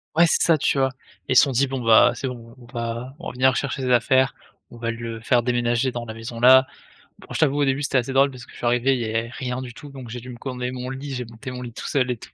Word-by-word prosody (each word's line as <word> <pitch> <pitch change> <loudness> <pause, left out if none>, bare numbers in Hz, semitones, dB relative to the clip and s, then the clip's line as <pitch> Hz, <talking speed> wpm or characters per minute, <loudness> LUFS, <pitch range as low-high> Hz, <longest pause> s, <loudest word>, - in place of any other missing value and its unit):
Ouais 170 +1 +6
c'est - - +2
ça, 165 -2 +4
tu 140 - +1
vois. 135 0 +3 0.4
Et - - +1
ils - - -1
se - - +8
sont 140 - 0
dit: 135 +2 +2
«Bon, 130 -1 -4
bah, 115 +1 +6
c'est 135 - -4
bon, 115 -1 -9
on 120 - -15
va 120 +2 -5
revenir 130 0 +1
chercher 135 -1 -2
ses 125 - 0
affaires, 130 +2 +3 0.4
on 120 - -12
va 115 0 -3
le 115 -1 -5
faire 120 0 +2
déménager 120 +1 +1
dans 120 -1 -5
la 110 - -7
maison, 115 +1 -7
là». 130 +2 +7 0.5
Bon, - - -15
je - - -3
t'avoue, 145 -2 +2
au - - +4
début, 135 +2 0
c'était 135 - +1
assez 130 +2 -1
drôle 135 +1 +4
parce 125 -1 -11
que - - -18
je - - -14
suis - - -5
arrivé, 125 +3 +3
il - - -3
y - - -2
avait 115 +1 -2
rien 125 0 -4
du 120 -2 -8
tout, 145 - -11
donc 130 -4 -10
j'ai 125 +1 -6
dû 125 +2 -11
me 120 - -8
commander 125 -1 -4
mon 125 0 -5
lit, 135 +1 -6
j'ai 125 -1 -4
monté 115 +3 -9
mon 125 0 -7
lit 120 -2 -8
tout - - -6
seul 130 -3 +1
et 120 - -3
tout. - - -14
125 Hz, 305 wpm, -23 LUFS, 120-130 Hz, 0.5 s, se